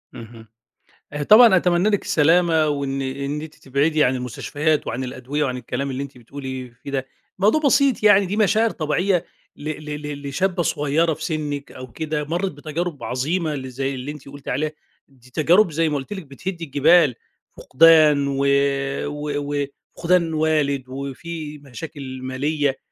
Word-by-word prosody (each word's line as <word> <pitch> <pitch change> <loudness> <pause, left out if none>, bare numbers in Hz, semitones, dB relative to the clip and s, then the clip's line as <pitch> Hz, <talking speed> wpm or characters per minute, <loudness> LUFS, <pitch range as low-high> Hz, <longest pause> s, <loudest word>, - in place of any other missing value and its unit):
اهم. 115 0 -11 0.7
آآ 145 0 -2
طبعًا 215 +3 +8
أتمنى 180 +2 +2
لِك 205 -2 +1
السلامة، 160 0 +3
وإن 140 -2 -2
إن 140 +2 -3
أنتِ 155 -1 -9
تبعدي 150 +3 +1
عن 130 -1 +2
المستشفيات 145 +5 -1
وعن 125 +3 -3
الأدوية 130 +4 -3
وعن 125 -2 -2
الكلام 135 +2 -4
اللي 130 +1 -3
أنتِ 140 -2 -11
بتقولي 130 0 -7
فيه 140 - -6
ده، 135 -1 -2 0.3
موضوع 215 +11 +3
بسيط 275 -4 +3
يعني 205 -2 +6
دي 200 +4 -3
مشاعر 220 +2 +3
طبيعية 175 +3 0 0.3
ل 150 - -6
ل 150 -1 -6
لشابّة 175 +5 0
صغيّرة 155 +2 +1
في 155 - -8
سنِّك 150 -3 -3
أو 130 -1 -10
كده، 155 0 -3
مرّت 175 +6 -2
بتجارب 155 +2 -5
عظيمة 155 +5 -1
ل 130 -1 -6
زي 135 +2 -3
اللي 130 +3 -5
أنتِ 145 -2 -11
قُلتِ 140 0 -13
عليها 150 +4 -1 0.4
دي 125 -2 -22
تجارب 170 - +4
زي 160 +1 +1
ما 150 - -1
قُلت 135 +8 -6
لِك 190 -3 -6
بتهد 170 +6 -6
الجبال 145 -1 +4 0.4
فقدان 155 -1 +5
و 140 0 0 0.6
و 145 0 -3 0.4
وفقدان 170 -1 +2
والد، 155 -3 +1
وفي 150 +3 -6
مشاكل 140 0 -8
مالية 140 +2 -1
150 Hz, 155 wpm, -22 LUFS, 135-165 Hz, 0.7 s, طبعًا